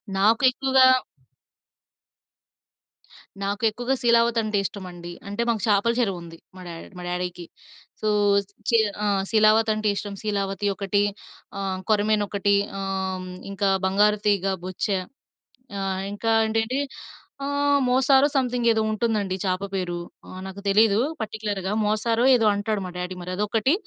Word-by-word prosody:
నాకు 215 Hz, +5 st, +3 dB
ఎక్కువగా 265 Hz, 0 st, +4 dB, 2.6 s
నాకు 200 Hz, +2 st, -3 dB
ఎక్కువగా 245 Hz, +5 st, -2 dB
'శీలావతి' 235 Hz, -1 st, +3 dB
అంటే 215 Hz, -1 st, -1 dB
ఇష్టమండి. 180 Hz, -4 st, -7 dB, 0.2 s
అంటే 205 Hz, +3 st, -3 dB
మాకు 225 Hz, -3 st, 0 dB
చాపల 210 Hz, +2 st, +3 dB
చెరువు 195 Hz, -7 st, 0 dB
ఉంది, 165 Hz, -1 st, -11 dB, 0.2 s
మా 185 Hz, -, -11 dB
డ్యాడీ 165 Hz, -1 st, -8 dB
మా -, -, -7 dB
డ్యాడీకి. 180 Hz, 0 st, -4 dB, 0.6 s
సో 215 Hz, -, -1 dB, 0.6 s
శీ 230 Hz, -, +5 dB, 0.3 s
ఆహ్, 200 Hz, -2 st, +1 dB
శీలావతి 220 Hz, 0 st, +4 dB
అంటే 215 Hz, 0 st, -2 dB
ఇష్టం 205 Hz, 0 st, -5 dB
శీలావతి 200 Hz, -1 st, -2 dB
ఒకటి 200 Hz, 0 st, 0 dB, 0.6 s
ఆహ్, 190 Hz, -1 st, -2 dB
కొరమేను 210 Hz, 0 st, +2 dB
ఒకటి 200 Hz, 0 st, +1 dB, 0.3 s
ఆహ్, 190 Hz, -1 st, -3 dB, 0.2 s
ఇంకా 200 Hz, 0 st, 0 dB, 0.2 s
బంగారు 205 Hz, +2 st, +3 dB
తీగ, 200 Hz, -2 st, +2 dB, 0.2 s
బొచ్చా, 185 Hz, +2 st, -2 dB, 0.8 s
ఆహ్, 190 Hz, -1 st, -2 dB
ఇంకా 225 Hz, +2 st, -1 dB
ఏంటంటే 225 Hz, +4 st, 0 dB, 0.7 s
ఆహ్, 285 Hz, 0 st, +2 dB
మోసారో 265 Hz, +2 st, +4 dB
సమ్‌థింగ్ 245 Hz, -2 st, 0 dB
ఏదో 220 Hz, -, +1 dB
ఉంటుందండి 215 Hz, -4 st, -1 dB
చాప 185 Hz, 0 st, 0 dB
పేరు 175 Hz, -2 st, -2 dB, 0.5 s
నాకు 190 Hz, +1 st, -8 dB
తెలీదు 210 Hz, +1 st, +4 dB, 0.2 s
పర్టిక్యులర్‌గా. 205 Hz, -3 st, -3 dB
మోసారో 225 Hz, +3 st, +1 dB
ఏదో 225 Hz, -3 st, +3 dB
అంటాడు 205 Hz, 0 st, -2 dB
మా -, -, -7 dB
డ్యాడీ 180 Hz, +1 st, -4 dB
మరి 180 Hz, -, -6 dB
అదొకటి. 210 Hz, +6 st, +1 dB
210 Hz, 130 wpm, -24 LUFS, 195-225 Hz, 2.6 s, శీ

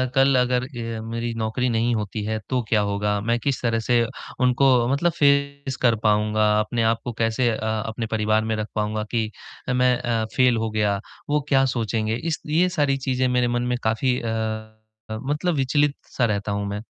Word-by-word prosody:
कल 135 Hz, 0 st, +4 dB
अगर 125 Hz, 0 st, +1 dB
अ, 115 Hz, -3 st, -5 dB
मेरी 115 Hz, +1 st, -3 dB
नौकरी 115 Hz, +3 st, -1 dB
नहीं 115 Hz, +1 st, +1 dB
होती 105 Hz, 0 st, -3 dB
है 110 Hz, +1 st, -2 dB
तो 130 Hz, -1 st, +1 dB
क्या 105 Hz, -2 st, +3 dB
होगा? 105 Hz, 0 st, 0 dB
मैं 115 Hz, +2 st, 0 dB
किस 135 Hz, +2 st, -1 dB
तरह 115 Hz, -2 st, +1 dB
से 120 Hz, +1 st, +2 dB, 0.4 s
उनको 125 Hz, -1 st, +4 dB
मतलब 170 Hz, +5 st, +2 dB
फेस 140 Hz, -1 st, +2 dB
कर 120 Hz, -3 st, +4 dB
पाऊँगा, 105 Hz, 0 st, +3 dB
अपने 115 Hz, +2 st, 0 dB
आप 115 Hz, 0 st, +2 dB
को 120 Hz, -, -4 dB
कैसे 115 Hz, +2 st, +1 dB
अ, 110 Hz, -, -1 dB, 0.3 s
अपने 115 Hz, +1 st, -4 dB
परिवार 110 Hz, 0 st, +1 dB
में 110 Hz, 0 st, -1 dB
रख 110 Hz, 0 st, -3 dB
पाऊँगा 105 Hz, 0 st, -1 dB
कि 110 Hz, -2 st, 0 dB, 0.4 s
अ, -, -, +1 dB
मैं 125 Hz, 0 st, +3 dB
अ, 115 Hz, -2 st, -1 dB
फेल 125 Hz, -2 st, +4 dB
हो 110 Hz, 0 st, -1 dB
गया, 105 Hz, -2 st, +1 dB, 0.3 s
वो 150 Hz, 0 st, +2 dB
क्या 135 Hz, -1 st, +4 dB
सोचेंगे। 115 Hz, -3 st, -1 dB
इस 160 Hz, +5 st, -3 dB
ये 170 Hz, +4 st, +3 dB
सारी 145 Hz, -6 st, +1 dB
चीज़ें 130 Hz, -1 st, 0 dB
मेरे 125 Hz, -1 st, +2 dB
मन 120 Hz, 0 st, 0 dB
में 125 Hz, -, +1 dB
काफ़ी 125 Hz, +3 st, +1 dB
अ, 110 Hz, -1 st, -3 dB, 0.4 s
मतलब 145 Hz, +10 st, -1 dB
विचलित-सा 140 Hz, -1 st, 0 dB
रहता 105 Hz, -2 st, -1 dB
हूँ 100 Hz, 0 st, -2 dB
मैं। 100 Hz, +1 st, -4 dB
115 Hz, 190 wpm, -23 LUFS, 110-130 Hz, 0.4 s, कल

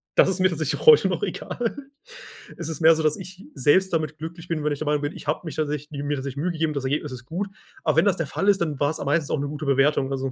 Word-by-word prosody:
Das -, -, +6 dB
ist 190 Hz, -1 st, -2 dB
mir 185 Hz, 0 st, +4 dB
tatsächlich 160 Hz, -3 st, -2 dB
heute 465 Hz, -1 st, +8 dB
noch -, -, -2 dB
egal. 240 Hz, +1 st, -3 dB, 0.8 s
Es -, -, -5 dB
ist 160 Hz, -, -5 dB
mehr 165 Hz, 0 st, +7 dB
so, 160 Hz, -, -2 dB
dass 155 Hz, -1 st, +2 dB
ich 185 Hz, 0 st, -10 dB
selbst 155 Hz, +8 st, +3 dB
damit 155 Hz, -2 st, -1 dB
glücklich 165 Hz, +2 st, -8 dB
bin, 160 Hz, -3 st, -1 dB
wenn 150 Hz, -, +1 dB
ich 145 Hz, -, -6 dB
der 155 Hz, -, -3 dB
Meinung 150 Hz, 0 st, +1 dB
bin, 145 Hz, +1 st, -3 dB
ich -, -, -11 dB
habe 150 Hz, -, 0 dB
mich 155 Hz, -, -6 dB
tatsächlich 150 Hz, -1 st, -2 dB
mir 145 Hz, 0 st, -1 dB
tatsächlich 135 Hz, 0 st, -5 dB
Mühe 175 Hz, +5 st, 0 dB
gegeben, 160 Hz, -2 st, -1 dB
das 140 Hz, -2 st, -3 dB
Ergebnis 145 Hz, +1 st, -1 dB
ist 125 Hz, -1 st, -9 dB
gut. 180 Hz, +8 st, -3 dB, 0.4 s
Aber -, -, +1 dB
wenn -, -, +5 dB
das 195 Hz, -3 st, +2 dB
der 165 Hz, -, -2 dB
Fall 195 Hz, -, -2 dB
ist, 200 Hz, -3 st, +3 dB
dann 150 Hz, -5 st, -1 dB
war's 145 Hz, +2 st, 0 dB
am -, -, -4 dB
meistens 150 Hz, 0 st, +1 dB
auch -, -, +1 dB
'ne 145 Hz, -, -2 dB
gute 150 Hz, +1 st, -5 dB
Bewertung, 140 Hz, 0 st, +2 dB
also, 135 Hz, -1 st, -2 dB
155 Hz, 285 wpm, -24 LUFS, 145-170 Hz, 0.8 s, heute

